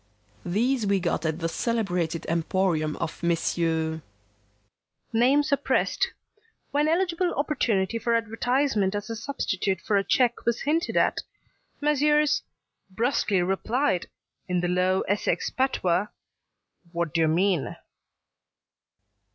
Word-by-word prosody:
These 230 +5 +1
we 200 -1 +2
got 170 -2 -1
at 160 0 -1
the 165 -1 -2
celebrated 175 -5 -1
emporium 165 -2 0
of 170 -2 -5
Messrs.. 165 -1 0 1.1
Name 260 +6 +4
suppressed. 290 +10 +1 0.6
When 295 +1 +2
eligible 350 +1 +1
opportunity 230 -8 0
for 235 0 +1
advertisement 230 -2 0
as 205 +2 -4
a - - -3
substitute 200 -6 -2
for 205 +1 0
a 195 - +2
cheque 240 +3 +1
was 235 -1 0
hinted 320 +4 0
at, - - +2 0.6
Messrs. 300 0 +3 0.5
brusquely 210 -3 +1
replied, 195 +2 0 0.4
in 180 -1 0
the 175 - 0
low 180 +1 +2
Essex 205 +1 -1
patois, 205 -8 +1 0.8
'Wadyermean?' 170 +1 +1
200 Hz, 105 wpm, -26 LUFS, 175-260 Hz, 1.1 s, Name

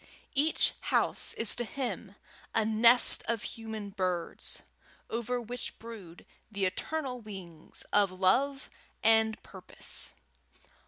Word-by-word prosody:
Each 300 +3 +3 0.2
house - - +3
is 230 - +5
to 240 - 0
him 225 -6 -5 0.4
a 220 - +3
nest 230 +3 +6
of 230 -2 -1
human 220 -3 -6
birds, 185 -3 -2 0.5
over 235 +2 -1
which 240 +1 -4
brood 210 -7 -11 0.3
the 200 -2 -1
eternal 255 +6 -3
wings 185 -7 -5
of 205 -1 +5
love 255 +10 +1 0.4
and 220 0 +4
purpose. - - -4
220 Hz, 110 wpm, -30 LUFS, 195-245 Hz, 0.5 s, nest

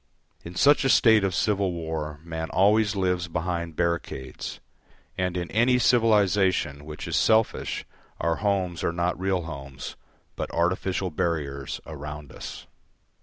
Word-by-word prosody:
In 85 +1 -9
such 145 +8 +5
a 135 - +2
state 110 -5 +6
of 95 -3 0
civil 100 -2 +1
war 80 -3 -4
man 80 -1 -4
always 105 +2 +3
lives 90 -2 0
behind 85 -1 -3
barricades, 85 -7 -3 0.6
and 90 -1 -1
in 85 -1 -4
any 120 +4 +4
civilisation 100 - +3
which 75 0 -7
is - - -1
selfish 110 0 +2 0.3
our 85 +1 0
homes 95 -4 0
are - - +1
not 85 +1 -1
real 95 -2 0
homes, 70 -4 -7 0.4
but - - -4
artificial 90 +2 0
barriers 75 -4 -2
around 75 -2 -7
us. - - -8
90 Hz, 135 wpm, -26 LUFS, 80-100 Hz, 0.6 s, state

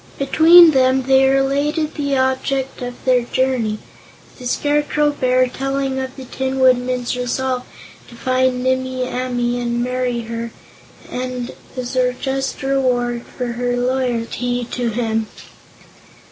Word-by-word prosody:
Between 325 +4 +7
them 260 -1 +3
they 265 +1 +4
related 285 +3 +1
the 280 -2 -1
object 265 +1 -1
of 245 0 -7
their 255 -1 +4
journey, 240 -3 0 0.6
the 250 - -5
Scarecrow 295 +2 +1
Bear 255 -2 +2
telling 270 +1 -2
of 260 0 -5
the 265 - -9
Tin 265 +1 -3
Woodman's 250 -1 +2
resolve 250 +1 -2 0.4
to 235 - -14
find 255 0 0
Nimmie 260 0 0
Amee 245 -1 -2
and 240 0 -1
marry 250 -1 -1
her, 230 0 -5 0.6
as 250 0 -6
a 250 -1 +2
just 270 +2 -3
reward 245 -3 0
for 250 - -5
her 245 +1 -2
loyalty 245 -1 -1
to 245 -2 -1
him. 225 -1 -1
255 Hz, 125 wpm, -19 LUFS, 245-265 Hz, 0.6 s, Between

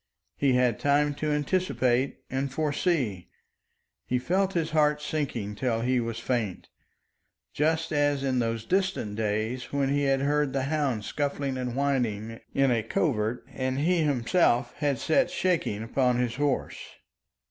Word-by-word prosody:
He 140 -2 +2
had 125 -3 +2
time 145 +1 +2
to 155 +2 -3
anticipate 145 -5 0
and 135 +1 -2
foresee. 145 - -1 0.8
He 125 - +1
felt 185 +9 0
his 165 -3 -1
heart 150 -1 +3
sinking 140 -9 -3
till 115 +1 -1
he 125 +1 +2
was 115 -1 -3
faint, 115 -6 -2 0.8
just 160 +2 0
as 145 -1 +1
in 130 -2 +1
those 115 -1 -1
distant 185 - 0
days 110 +3 -2
when 140 -1 +1
he 145 +1 +1
had 135 -1 +2
heard 145 0 +1
the 135 -1 0
hounds 140 -7 -1
scuffling 140 -2 -2
and 125 -1 -3
whining 115 -6 -1
in 135 -1 +2
a 115 -2 +2
covert 115 - -1
and 130 0 -2
he 170 +5 +2
himself 140 -1 +2
had 145 -3 0
sat 270 - +2
shaking 165 - 0
upon 125 +1 +1
his 125 -1 -1
horse. 145 -2 -1
135 Hz, 145 wpm, -27 LUFS, 120-150 Hz, 0.8 s, heart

